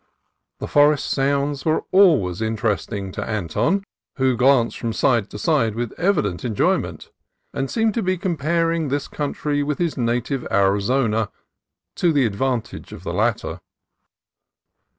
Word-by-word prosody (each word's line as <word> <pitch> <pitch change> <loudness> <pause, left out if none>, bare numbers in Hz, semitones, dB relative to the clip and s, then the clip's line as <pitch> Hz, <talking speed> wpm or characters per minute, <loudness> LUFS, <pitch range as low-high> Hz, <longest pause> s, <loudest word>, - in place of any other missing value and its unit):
The - - -5
forest 145 0 +3
sounds 140 +1 0
were 160 0 +1
always 145 - +4
interesting 110 -3 -2
to - - -4
Anton, 110 - -1 0.3
who 130 -2 +2
glanced 125 -1 +3
from 115 -1 -2
side 115 -5 +1
to - - -8
side 115 -4 +1
with 120 -1 -3
evident 155 - 0
enjoy 115 -5 +2
ment, - - -8 0.4
and 135 0 -2
seemed 225 -2 +1
to 230 - -1
be 185 -2 0
comparing 165 -1 0
this 140 +1 -2
country 145 0 -2
with 145 0 -1
his 170 -4 -1
native 125 +2 -1
Arizona, 105 +3 +1 0.7
to 175 - +3
the 145 -3 +3
disadvantage 120 +3 -3
of - - -10
the - - -4
latter. - - -1
135 Hz, 140 wpm, -22 LUFS, 110-155 Hz, 0.7 s, always